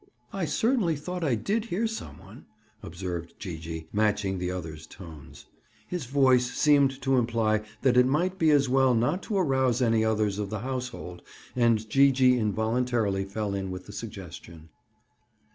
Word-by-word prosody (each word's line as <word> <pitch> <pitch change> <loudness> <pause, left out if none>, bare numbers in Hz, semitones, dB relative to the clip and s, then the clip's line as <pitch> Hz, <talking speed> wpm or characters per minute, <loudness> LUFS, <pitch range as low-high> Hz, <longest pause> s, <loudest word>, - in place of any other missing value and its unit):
"I 195 -3 -1
certainly 220 - +1
thought 180 +4 -5
I 135 -6 +2
did 210 - -1
hear 225 +1 -1
some 220 - -5
one," 95 +7 -15 0.3
observed 85 -1 -6
Gee 90 -5 -6
gee, 80 0 -7
matching 105 -3 0
the 90 0 -2
other's 80 -4 -6
tones. 80 -6 -12 0.4
His 175 -8 -5
voice 130 -2 +3
seemed 140 -3 +3
to 135 -1 +2
imply 115 -2 +1 0.2
that 130 -2 +3
it 125 0 +6
might 180 +7 0
be 160 - +4
as 145 -2 +4
well 130 -1 +3
not 125 +12 +1
to 205 - -3
arouse 130 - +1
any 115 -3 +2
others 105 -2 0
of 105 -2 -3
the 105 0 -4
household 125 -9 -5 0.3
and 115 -3 +2
Gee 140 +5 +5
gee 130 -1 +3
involuntarily 110 -2 0
fell 100 +1 -3
in 95 -1 -3
with 90 0 -7
the - - -11
suggestion. 85 -1 -9
120 Hz, 165 wpm, -27 LUFS, 95-135 Hz, 0.4 s, it